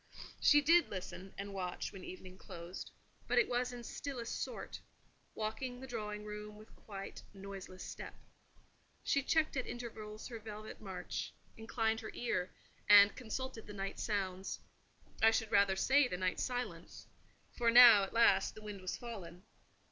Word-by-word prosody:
She 295 -1 +6
did 335 +4 +5
listen, 190 0 -6
and 200 0 -5
watch, 180 -2 -3
when 190 -2 -10
evening 185 0 -9
closed; 175 -1 -8 0.4
but - - +1
it 485 - +5
was 245 +1 0
in 245 -1 -8
stillest 240 -1 -5
sort: - - -6 0.6
walking 235 +4 -3
the 265 - -7
drawing 210 -4 -5
room 210 0 -7
with 215 +1 -15
quite 195 -2 -8
noiseless 195 -1 -8
step. - - -7 0.9
She 280 - +2
checked 315 +3 +2
at 260 - -1
intervals 215 -3 -7
her 230 -2 -6
velvet 215 0 -8
march; 185 -3 -5 0.2
inclined 225 0 -1
her 225 - -7
ear, 185 -7 -1 0.4
and 205 0 +9
consulted 255 0 -5
the 210 - -8
night 195 0 -4
sounds: 190 -3 -2 0.6
I 225 - +8
should 225 -1 0
rather 200 -1 +4
say, 270 +7 +4
the 180 - -3
night 185 0 -1
silence; 230 -10 -4 0.5
for 235 -1 +1
now, 235 -3 +10
at 195 - -2
last, 200 -4 +4
the 215 - -11
wind 205 -2 -7
was 185 - -3
fallen. 190 -7 -8
215 Hz, 155 wpm, -35 LUFS, 195-240 Hz, 0.9 s, now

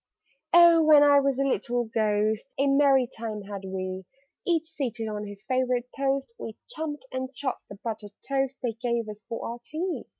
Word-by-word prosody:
"Oh, 340 -1 +8
when 305 -2 +7
I 285 -1 +7
was 275 -2 +1
a 275 - +2
little 245 -2 0
Ghost, 215 +1 0
A 275 - +2
merry 275 -2 +4
time 220 -3 -6
had 200 -1 -7
we! 185 0 -4 0.4
Each 330 -2 +2
seated 240 -8 -3
on 210 -1 -4
his 200 0 -10
favourite 250 0 0
post, 275 +7 -1
We 220 - -7
chumped 295 -4 -5
and 260 0 -3
chawed 265 -2 -3
the 200 - -8
buttered 215 -3 -5
toast 270 -1 0
They 240 -2 0
gave 235 0 -2
us 210 0 -8
for 230 - -4
our 235 +1 -5
tea." 340 +7 -3
250 Hz, 180 wpm, -27 LUFS, 215-275 Hz, 0.4 s, Oh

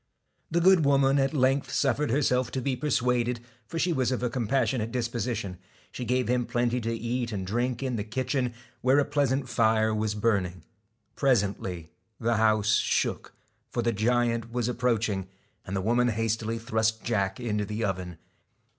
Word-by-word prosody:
The 170 - +1
good 185 -2 +6
woman 140 0 +4
at 135 0 +2
length 135 -2 +1
suffered 140 0 +1
herself 125 -1 +1
to 130 - -1
be 130 +1 -1
persuaded, 125 -3 0 0.3
for 165 - -5
she 175 +1 +1
was 130 -4 +1
of 125 -1 -2
a 125 - 0
compassionate 120 -1 0
dis 120 -1 -1
position. 115 -6 -3 0.3
She 125 - -5
gave 125 +1 +1
him 125 0 +1
plenty 120 0 0
to 115 +1 -2
eat 120 +1 -2
and 95 -3 -3
drink 120 +5 -1
in 130 -3 -1
the 105 - -2
kitchen, 125 +2 -2 0.3
where 130 +2 +4
a 145 - +4
pleasant 140 -2 0
fire 110 -2 +2
was 110 0 -1
burning. 100 -6 0 0.5
Presently 100 - 0 0.3
the 115 0 +1
house 110 -1 +3
shook, - - -1 0.3
for 120 - -2
the 115 0 +1
giant 115 +1 +1
was 120 -1 -1
ap 125 - -3
proaching; 110 -6 0 0.4
and 95 - -3
the 95 - 0
woman 120 +4 +2
hastily 115 0 -1
thrust 110 -1 0
Jack 100 -4 -1
into 105 -4 -1
the 105 +2 -3
oven. 90 -3 -4
120 Hz, 170 wpm, -27 LUFS, 110-130 Hz, 0.5 s, good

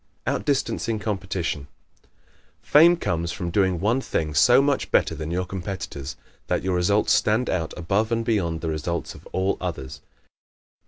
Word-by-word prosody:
Outdistancing 115 -5 0
Competition 95 -8 -3 0.4
¶ - - -33 0.6
Fame 170 +4 +6
comes 85 - -2
from 85 -2 -4
doing 95 -2 +2
one 115 +8 +1
thing 75 - -2
so 120 - +6
much 140 0 +1
better - - +2
than 80 0 -5
your 90 +2 -1
competitors 90 -7 -5 0.3
that - - 0
your 95 0 0
results 100 +4 +2
stand 110 +4 +2
out 80 -3 -1
above 100 +6 0
and 115 0 0
beyond 85 -8 0
the 80 - -2
results 80 +2 -3
of - - -14
all 95 +1 0
others. 80 -7 -5
95 Hz, 155 wpm, -24 LUFS, 85-110 Hz, 0.6 s, Fame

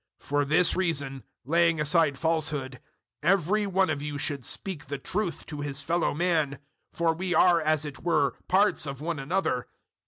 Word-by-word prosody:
004:025 - - -18
For 145 0 +2
this 160 +5 +3
reason, 140 -8 -1 0.2
laying 165 +2 +3
aside 150 -1 +2
falsehood, 150 -6 -1 0.4
every 195 +5 +2
one 190 -2 +2
of 140 -2 -3
you 145 0 -4
should 140 -2 -2
speak 170 +2 -2
the 140 +1 -4
truth 185 +4 -3
to 150 -2 -6
his 145 0 -3
fellow 170 +3 +1
man; 160 -4 +1 0.3
for 165 -1 +1
we 180 +2 -2
are, 175 -2 +5
as 155 -1 +1
it 145 -2 -7
were, 160 -5 +1 0.2
parts 190 -4 +3
of 140 -1 -5
one 160 0 -3
another. 135 -3 -1
155 Hz, 175 wpm, -27 LUFS, 145-175 Hz, 0.4 s, are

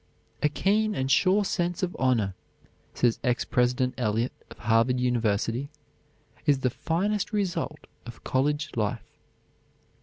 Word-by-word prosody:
"A 150 - +3
keen 210 +7 +1
and 130 -2 -1
sure 200 +7 +4
sense 175 +1 -1
of 180 - -1
honor," 115 -7 +2 0.6
says 120 -2 +2
Ex 125 -1 +1
President 125 +1 +1
Eliot, 115 +1 0 0.2
of - - -12
Harvard 115 +2 +2
University, 120 +1 0 0.8
"is 140 -2 +3
the 130 - +1
finest 195 - -1
result 190 -7 -2 0.2
of 120 - -10
college 145 +3 0
life." 105 -3 -1
130 Hz, 125 wpm, -27 LUFS, 120-175 Hz, 0.8 s, sure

